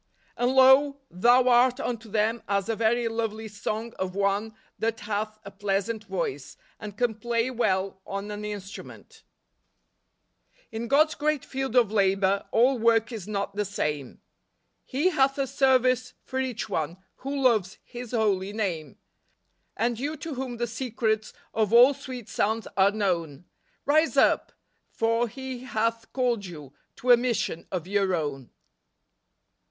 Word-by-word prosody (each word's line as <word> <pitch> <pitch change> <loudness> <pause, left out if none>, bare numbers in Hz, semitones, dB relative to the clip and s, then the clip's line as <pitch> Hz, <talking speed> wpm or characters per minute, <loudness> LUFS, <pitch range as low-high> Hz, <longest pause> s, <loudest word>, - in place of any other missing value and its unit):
"And, 245 +2 +1
lo, 265 +2 +6
thou 245 +7 +4
art 250 +1 +4
unto 230 -4 -4
them 220 +2 0
as 200 -1 0
a 225 - 0
very 230 +2 +1
lovely 225 -1 -3
song 215 +2 -4
of 185 0 -3
one 200 +2 0 0.2
that 225 0 -1
hath 215 +1 -3
a 200 - -8
pleasant 205 +2 -2
voice, 170 -8 -4 0.2
and 210 -1 -8
can 245 -1 +1
play 235 +2 -1
well 190 -5 0
on 200 +1 -4
an 210 0 -6
instrument 205 -2 -8 0.5
." - - -49
" - - -38
In 225 +1 -4
God's 305 +5 +4
great 300 -2 -1
field 265 -2 -4
of 235 -5 +4
labor 195 -1 +2
All 250 +2 +3
work 230 +1 +3
is 215 -6 -6
not 200 -1 -3
the 210 - 0
same; 150 -9 -3 0.7
He 295 +8 +1
hath 275 -3 +2
a 275 - +1
service 255 -2 +2
for 260 - -4
each 255 -4 -2
one 160 +2 -2 0.2
TT7iO 275 +1 -3
loves 215 -7 +2 0.2
Ilis 245 0 -6
holy 200 -2 +1
name. 170 -10 -3 0.8
And 235 +1 0
you 295 +4 -3
to 325 -2 -6
whom 255 -2 -5
the 240 - 0
secrets 225 -2 -2 0.2
Of 220 -2 +1
all 245 +4 +8
sweet 255 -4 -8
sounds 220 +2 -1
are 195 0 +5
known. 175 -7 -2 0.4
Rise 310 +3 +3
up! - - +3 0.4
for 230 +1 +1
He 260 +2 -7
hath 230 -2 -2
called 240 -6 0
you 150 -6 -10 0.2
To 250 - +1
a 240 - +9
mission 230 -8 -2
of 180 -3 -3
your 195 -1 +1
own." 145 -6 -4
225 Hz, 155 wpm, -26 LUFS, 200-250 Hz, 0.8 s, a